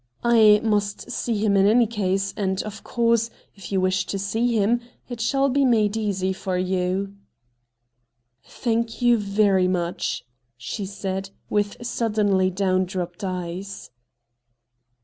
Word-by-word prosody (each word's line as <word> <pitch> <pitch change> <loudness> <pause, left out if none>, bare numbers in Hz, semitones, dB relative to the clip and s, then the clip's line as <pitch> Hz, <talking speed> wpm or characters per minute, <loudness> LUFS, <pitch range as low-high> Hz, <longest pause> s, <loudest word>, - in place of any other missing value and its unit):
' - - -37
I 210 -2 +7
must 205 +1 -1
see 235 -2 -1
him 205 -1 +2
in 195 0 +5
any 235 +3 +5
case, 195 -3 -1
and 190 -1 -1
of 215 -1 -8
course, 230 -1 +1 0.2
if 195 -1 -11
you 195 - +2
wish 185 +1 +1
to 200 - -2
see 220 +5 0
him 225 +4 +2 0.3
it 240 -2 -6
shall 275 +4 +2
be 275 +1 +2
made 220 -5 +3
easy 195 -4 -1
for 185 -1 -3
you. 185 +1 -1 0.7
' 120 0 -51 0.2
Thank 230 0 -1
you, 240 -1 +5
very 200 -2 +2
much', 175 -6 -2 0.3
she 190 - -5
said, 195 -1 -4 0.2
with 205 +3 -1
suddenly 210 -5 +1
down 185 0 +1
dropped 180 +1 -5
eyes. 185 +1 -5
200 Hz, 145 wpm, -23 LUFS, 185-220 Hz, 0.7 s, I